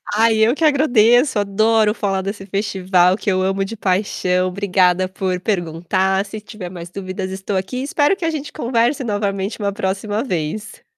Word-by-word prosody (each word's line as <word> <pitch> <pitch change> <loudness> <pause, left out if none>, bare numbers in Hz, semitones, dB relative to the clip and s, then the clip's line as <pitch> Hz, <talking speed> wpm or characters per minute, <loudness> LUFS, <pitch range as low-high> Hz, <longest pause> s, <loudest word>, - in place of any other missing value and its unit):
Ai 225 +1 +4
eu 225 +3 +4
que 320 - -3
agradeço, 250 -4 +4
adoro 215 +2 +2
falar 195 -3 -1
desse 195 0 -5
festival 190 -2 +2
que 210 - -3
eu 185 0 +1
amo 195 +1 0
de 220 +3 -6
paixão, 185 -1 0
obrigada 185 -1 +2
por 185 -1 -2
perguntar, 190 +1 0
se 215 +1 -8
tiver 210 -4 -8
mais 175 -1 -9
dúvidas 185 0 -5
estou 190 +1 -4
aqui, 190 +7 -3
espero 290 +5 +2
que 370 - -4
a - - +2
gente 300 -3 -5
converse 245 0 0
novamente 205 -1 -2
uma 200 -1 -1
próxima 200 +2 -2
vez. 205 - -4
200 Hz, 170 wpm, -19 LUFS, 185-225 Hz, -, Ai